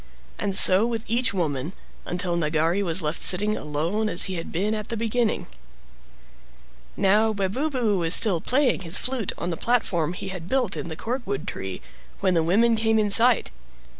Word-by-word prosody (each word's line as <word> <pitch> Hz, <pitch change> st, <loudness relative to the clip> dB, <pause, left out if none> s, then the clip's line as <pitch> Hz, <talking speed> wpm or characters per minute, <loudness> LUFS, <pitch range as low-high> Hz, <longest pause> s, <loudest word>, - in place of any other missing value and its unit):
And 195 Hz, -2 st, -1 dB
so 190 Hz, +5 st, +7 dB
with 230 Hz, -2 st, -4 dB
each 240 Hz, +3 st, +1 dB
woman, 160 Hz, -4 st, -3 dB, 0.3 s
until 175 Hz, -1 st, -2 dB
Nagari 165 Hz, +3 st, 0 dB
was 175 Hz, -2 st, +1 dB
left 150 Hz, +2 st, -2 dB
sitting 210 Hz, +3 st, +2 dB
alone 165 Hz, +9 st, -3 dB
as 175 Hz, -, +4 dB
he 190 Hz, -, +1 dB
had 165 Hz, -, -6 dB
been 200 Hz, +6 st, -1 dB
at 215 Hz, -1 st, -5 dB
the 230 Hz, -, -3 dB
beginning. 230 Hz, 0 st, -1 dB, 1.5 s
Now 210 Hz, +3 st, +2 dB
Webubu 215 Hz, +2 st, -1 dB
was 165 Hz, +1 st, +5 dB
still 195 Hz, -8 st, +2 dB
playing 255 Hz, -3 st, +1 dB
his 175 Hz, 0 st, 0 dB
flute 255 Hz, -6 st, -2 dB
on 175 Hz, -, -4 dB
the 165 Hz, -, -4 dB
platform 180 Hz, -9 st, 0 dB
he 185 Hz, -, -7 dB
had 180 Hz, -3 st, -7 dB
built 250 Hz, -7 st, 0 dB
in -, -, -5 dB
the 160 Hz, -, -5 dB
corkwood 230 Hz, -, -5 dB
tree, 95 Hz, -1 st, -6 dB, 0.4 s
when 185 Hz, -, +1 dB
the 165 Hz, -, +2 dB
women 220 Hz, +8 st, +2 dB
came 220 Hz, 0 st, +1 dB
in 210 Hz, -2 st, 0 dB
sight. 235 Hz, -, +3 dB
200 Hz, 175 wpm, -23 LUFS, 170-225 Hz, 1.5 s, so